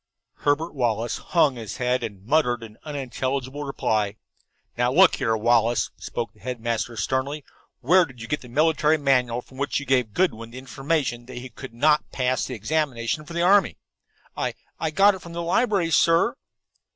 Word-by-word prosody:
Herbert 155 +4 0
Wallace 120 -4 -1
hung 150 -7 +2
his 110 -1 -6
head 125 -1 0
and 105 -4 -7
muttered 125 -3 +2
an 110 -1 -11
unintelligible 135 -1 -3
reply. 110 -7 -1 0.6
"Now - - +1
look - - +6
here, 110 0 +1
Wallace," 120 +1 +2
spoke 115 -3 -4
the - - -24
headmaster 120 -1 -3
sternly, 135 +6 -2 0.4
"where 175 +8 +5
did 130 -5 -15
you 115 - -7
get 150 - -2
the 125 - -12
military 155 +3 +3
manual 125 -4 +1
from 130 - -15
which 140 +1 0
you 140 - -7
gave 125 -5 +1
Goodwin 115 -12 0
the 120 - -11
information 135 -2 -2
that 130 - -9
he 125 +1 -7
could 120 0 -10
not 150 +4 +2
pass 130 0 0
the 125 - -5
examination 140 +2 -1
for 170 - -8
the 170 0 0
army?" 195 0 +4 0.6
"I - - -2 0.2
I 160 - 0
got 200 +6 +5
it 190 - -7
from 170 - -10
the 170 0 -3
library, 190 -1 +1
sir." 165 +9 +4
130 Hz, 175 wpm, -24 LUFS, 120-155 Hz, 0.6 s, look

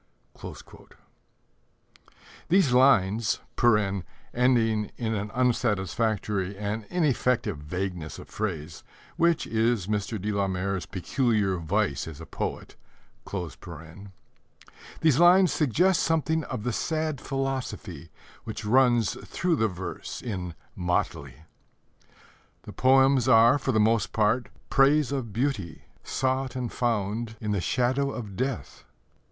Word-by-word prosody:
These 180 -8 +4
lines 110 -4 +4 0.9
(ending 115 -4 +2
in 115 -2 -2
an 105 0 -3
unsatisfactory 105 -4 0
and 105 +1 -3
ineffective 125 - 0
vagueness 90 +1 -4
of - - -11
phrase, 85 -7 -5 0.3
which 170 -1 +2
is 115 -3 +1
Mr. 105 +1 -2
de 105 +3 -2
la 100 -1 0
Mare's 95 0 -2
peculiar 105 -1 0
vice 85 -3 -1
as 80 -2 -9
a 80 - -8
poet) - - -5 2.7
suggests 170 - +2
something 160 0 +1
of 105 - -5
the 125 - -1
sad 155 0 -2
philosophy 135 - -4 0.3
which 110 -1 -6
runs 120 -1 +3 0.2
through 175 -2 0
the 110 -6 +2
verse 95 -2 -6
in 90 -7 -4 0.2
Motley. 75 -6 -2 1.2
The - - -10
poems 135 -1 +4
are, 115 +3 +6
for - - -1
the 110 - +2
most 110 0 +2
part, 110 +3 +1 0.2
praise 140 0 +4
of 130 -6 -3
beauty 110 - -2 0.2
sought 130 -1 -1
and 125 -3 -3
found 110 -1 -1
in 105 -2 -3
the 100 -3 0
shadow 130 +7 +1
of 110 -7 -6
death. 130 +4 -4
110 Hz, 110 wpm, -27 LUFS, 100-130 Hz, 2.7 s, are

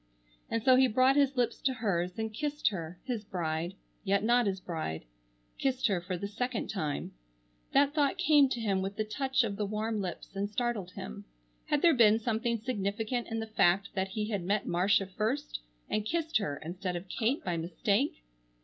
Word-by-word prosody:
And 230 -1 -1
so 255 0 +6
he 260 0 +6
brought 255 +3 +4
his 280 -2 +3
lips 245 -1 0
to 260 -1 +1
hers, 180 -6 -1
and 220 -1 -3
kissed 295 +6 0
her, 175 -3 -6
his 245 -5 -3
bride, 170 -2 -3 0.3
yet 200 0 +2
not 240 0 +4
his 190 -1 -1
bride. 160 - -4 0.5
Kissed 260 -1 0
her 190 -5 +2
for 180 +1 -3
the 200 - -4
second 245 +3 -2
time. 155 -8 -3 0.6
That 280 +1 +4
thought 290 -3 +2
came 290 -3 +5
to 245 - -2
him 200 -4 0
with 195 +1 -3
the 215 - 0
touch 265 +4 0
of 205 -3 -3
the 210 - 0
warm 215 +1 -2
lips 185 +1 -6
and 200 +1 -1
startled 220 -4 -2
him. 65 - -7 0.4
Had 295 - +1
there 340 -2 +7
been 220 -4 +6
something 230 +1 0
significant 220 +1 -2
in 225 0 -3
the - - -3
fact 200 -3 +2
that 190 -1 0
he 210 +2 -3
had 200 -4 -1
met 200 +3 0
Marcia 195 +3 +2
first 220 +10 -2 0.3
and 215 - 0
kissed 320 +6 0
her 145 -9 -3
instead 180 +2 -3
of 175 +2 -5
Kate 235 - 0
by 175 -2 0
mistake? 165 - 0
215 Hz, 195 wpm, -31 LUFS, 190-245 Hz, 0.6 s, there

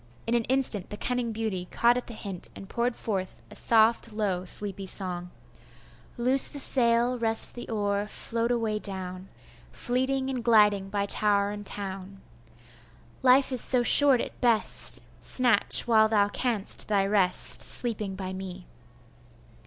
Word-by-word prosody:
In 230 - -3
an 235 -2 -1
instant 255 -7 0
the 210 - -7
cunning 245 -1 -3
beauty 215 -5 -5
caught 235 +1 +1
at 250 - -6
the 235 - -9
hint, 195 -4 -5
and 195 - -12
poured 235 +3 -3
forth 190 -4 -6
a - - -13
soft, 225 0 +1
low, 200 -4 -4
sleepy 195 +1 -2
song: 180 -2 -6 0.9
'Loose 255 +3 +5
the - - -7
sail, 245 -2 0
rest 225 -1 +8
the 240 - -10
oar, 205 -2 -3
float 230 +2 -4
away 225 -3 -3
down, 185 -2 -6 0.4
Fleeting 260 +2 -3
and 250 -3 -6
gliding 210 -4 +2
by 200 0 -3
tower 200 0 -1
and 205 -1 -6
town; 195 -1 -5 1.0
Life 260 +1 +3
is 255 - +3
so 250 -2 +2
short 275 0 +5
at - - -10
best! 235 -3 +2 0.2
snatch, 245 -5 +3
while 220 -2 +3
thou 205 -2 +1
canst, 220 -2 -1
thy 200 -2 0
rest, 195 -3 0
Sleeping 215 -5 0
by 190 -1 -7
me! 185 -1 -10
215 Hz, 150 wpm, -25 LUFS, 195-240 Hz, 1.0 s, rest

